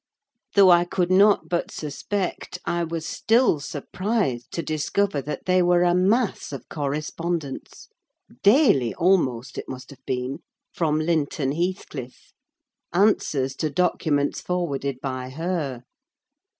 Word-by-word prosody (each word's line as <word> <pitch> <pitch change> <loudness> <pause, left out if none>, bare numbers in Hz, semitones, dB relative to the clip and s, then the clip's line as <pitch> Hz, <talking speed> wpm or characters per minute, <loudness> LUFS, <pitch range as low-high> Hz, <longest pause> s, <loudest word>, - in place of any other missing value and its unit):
Though 195 -2 +7
I 175 0 +6
could 175 0 -1
not 200 +2 +5
but 175 -1 -1
suspect, 180 +5 -4
I 170 0 0
was 165 -1 -4
still 230 - +2
surprised 145 - -2
to 170 - -2
discover 155 +2 0
that 150 +3 -6
they 185 0 +3
were 175 0 +4
a 175 0 +3
mass 200 +4 +1
of 140 - -7
correspondence—daily 150 - -1
almost, 150 -10 +1
it - - -8
must 130 +2 -8
have 140 - -15
been—from 135 +4 -3
Linton 155 -4 0
Heathcliff: 155 -6 -4 0.6
answers 155 -8 +2
to 155 - -1
documents 150 -4 0
forwarded 140 -7 -2
by 130 -2 -4
her. 150 -4 -3
165 Hz, 115 wpm, -24 LUFS, 140-180 Hz, 0.6 s, Though